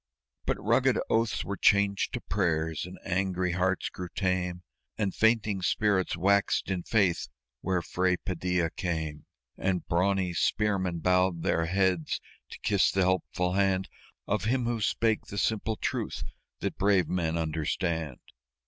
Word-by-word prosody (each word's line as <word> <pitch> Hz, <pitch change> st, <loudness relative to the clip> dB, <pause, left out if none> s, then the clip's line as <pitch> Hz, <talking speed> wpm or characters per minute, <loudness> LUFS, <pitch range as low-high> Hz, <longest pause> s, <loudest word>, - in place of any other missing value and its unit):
But -, -, +1 dB
rugged -, -, +3 dB
oaths 115 Hz, 0 st, +1 dB
were 100 Hz, -, -3 dB
changed 100 Hz, -1 st, +3 dB
to -, -, -3 dB
prayers, 80 Hz, -4 st, -1 dB
and 90 Hz, -, -10 dB
angry 95 Hz, -1 st, 0 dB
hearts 95 Hz, +1 st, 0 dB
grew 90 Hz, -1 st, -7 dB
tame, 90 Hz, -2 st, -1 dB, 0.3 s
And 100 Hz, -3 st, 0 dB
fainting 110 Hz, -3 st, +2 dB
spirits 95 Hz, -2 st, +1 dB
waxed 100 Hz, +2 st, +2 dB
in 90 Hz, -2 st, -1 dB
faith 100 Hz, -3 st, +1 dB, 0.3 s
where 90 Hz, +2 st, -1 dB
Fray 90 Hz, 0 st, +1 dB
Padilla 90 Hz, -2 st, -1 dB
came; 80 Hz, -5 st, -4 dB, 0.3 s
And 95 Hz, -2 st, 0 dB
brawny 90 Hz, +1 st, +1 dB
spearmen 95 Hz, -2 st, 0 dB
bowed 90 Hz, -1 st, +2 dB
their 80 Hz, 0 st, +1 dB
heads 95 Hz, -2 st, +1 dB, 0.3 s
to -, -, -9 dB
kiss 100 Hz, -2 st, +3 dB
the 95 Hz, -, +1 dB
helpful 90 Hz, -1 st, 0 dB
hand 95 Hz, -1 st, +1 dB, 0.4 s
Of 105 Hz, -1 st, -1 dB
him 125 Hz, +2 st, +1 dB
who 120 Hz, -1 st, -1 dB
spake 110 Hz, +1 st, +1 dB
the 100 Hz, -, -7 dB
simple 110 Hz, +1 st, 0 dB
truth -, -, -3 dB, 0.4 s
that -, -, -3 dB
brave 95 Hz, -3 st, +3 dB
men 85 Hz, -2 st, -1 dB
understand. 80 Hz, -2 st, -2 dB
95 Hz, 140 wpm, -29 LUFS, 85-100 Hz, 0.4 s, rugged